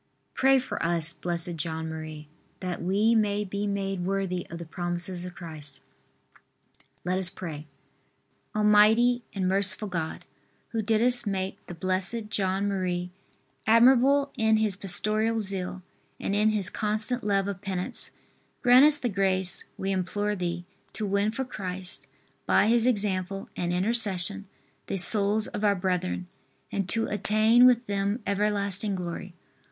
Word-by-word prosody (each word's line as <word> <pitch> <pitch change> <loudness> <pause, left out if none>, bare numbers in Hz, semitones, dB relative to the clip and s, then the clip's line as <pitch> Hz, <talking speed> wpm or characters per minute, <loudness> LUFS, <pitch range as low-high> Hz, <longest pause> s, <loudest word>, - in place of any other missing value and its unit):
V. - - -45 0.2
Pray 270 0 +4
for 260 - -3
us, 165 -1 +3
Blessed 175 -1 -4
John 160 +1 -3
Marie, 155 -1 -7
R. 170 +4 -13
That 180 - -4
we 200 +6 +2
may 210 -2 +1
be 200 +1 -3
made 195 -2 -2
worthy 190 -1 -2
of 170 - -7
the 170 - -8
promises 175 +2 -3
of 180 -1 -9
Christ. 155 -5 -8 1.3
LET 185 +1 0
US 185 -2 +2
PRAY. 155 -5 -7 0.9
Almighty 215 +4 +4
and 190 -2 0
merciful 200 +3 +1
God, 165 -4 -4 0.4
who 225 - -2
didst 230 +2 +2
make 190 -1 -3
the 175 - -7
Blessed 190 +5 -2
John 195 -1 0
Marie 180 -2 -2 0.6
admirable 265 +5 +5
in 220 -2 +3
his 215 -3 0
pastoral 215 +4 0
zeal 190 -2 -2 0.4
and 200 - -2
in 210 +1 +3
his 205 -3 +1
constant 215 +4 0
love 200 -1 +1
of 195 -2 -5
penance, 190 -3 -3 0.5
grant 250 +2 +7
us 300 -1 +9
the 255 - -2
grace, 190 -3 0
we 195 +1 -2
implore 205 +3 -1
Thee, 175 -2 -4 0.3
to 215 - -3
win 200 +1 +1
for 265 +4 -3
Christ, 185 - -6 0.4
by - - +4
his 230 +2 +3
example 195 -4 -1
and 175 -1 -2
intercession, 200 0 +1 0.4
the 195 - -2
souls 205 +3 +3
of 205 - -5
our 205 -1 +3
brethren, 185 -1 -2 0.5
and 195 -2 -2
to 225 0 +1
attain 215 +4 +4
with 245 -1 +3
them 200 +2 -2
everlasting 200 0 +1
glory. 175 0 -6
195 Hz, 145 wpm, -27 LUFS, 180-215 Hz, 1.3 s, us